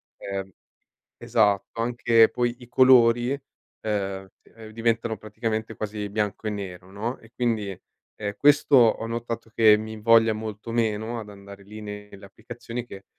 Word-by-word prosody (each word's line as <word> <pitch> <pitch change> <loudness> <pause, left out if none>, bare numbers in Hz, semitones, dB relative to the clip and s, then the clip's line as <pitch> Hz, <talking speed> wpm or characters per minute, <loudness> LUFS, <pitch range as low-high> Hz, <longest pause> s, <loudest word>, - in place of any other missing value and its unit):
ehm, 95 -1 -5 0.7
esatto, 105 0 +1
anche 115 -1 +4
poi 120 -1 -1
i 120 - -13
colori, 120 -1 +5
ehm, 100 -8 -5
d - - -24
ehm, 110 -1 -11
diventano 115 0 -1
praticamente 110 +1 -4
quasi 105 -1 -4
bianco 105 +1 -2
e - - +1
nero, 95 -3 -7
no, 115 +6 -4
e 115 - -19
quindi, 110 -6 -1 0.4
ehm, 105 -1 -4
questo 145 0 +4
ho 115 -3 +4
notato 115 0 -5
che 110 -2 +6
mi 110 +1 -6
invoglia 115 +1 +4
molto 110 +1 -6
meno 115 0 -1
ad 105 -2 -9
andare 100 0 -12
lì 105 +2 -10
nelle 105 -1 -9
applicazioni, 115 +4 -8
che 100 -5 -11
110 Hz, 150 wpm, -25 LUFS, 105-115 Hz, 0.7 s, che